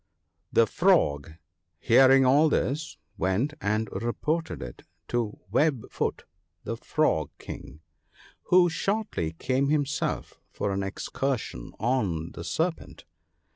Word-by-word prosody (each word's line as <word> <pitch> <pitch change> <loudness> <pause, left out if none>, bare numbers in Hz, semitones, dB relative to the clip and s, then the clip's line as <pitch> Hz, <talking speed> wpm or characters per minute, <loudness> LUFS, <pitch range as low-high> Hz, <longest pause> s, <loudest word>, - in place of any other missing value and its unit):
' 85 +1 -50
The 115 - +7
Frog, 80 - +2 0.5
hearing 135 +6 +6
all 145 +5 +5
this, 150 +2 -1 0.2
went 100 +11 +1
and 110 +2 0
reported 155 - -2
it - - -9 0.3
to 115 -3 -1
Web 145 -7 +1
foot - - -2 0.4
the 115 - -3
Frog 115 - 0
King, 75 +3 -9 0.6
who 180 -1 +5
shortly 175 - -2
came 130 +10 0
himself 150 +1 -1
for 100 - -2
an 100 0 -1
excursion 100 - -3
on 95 -10 0
the 85 - -8
Serpent. 100 - -3
120 Hz, 115 wpm, -27 LUFS, 90-155 Hz, 0.6 s, The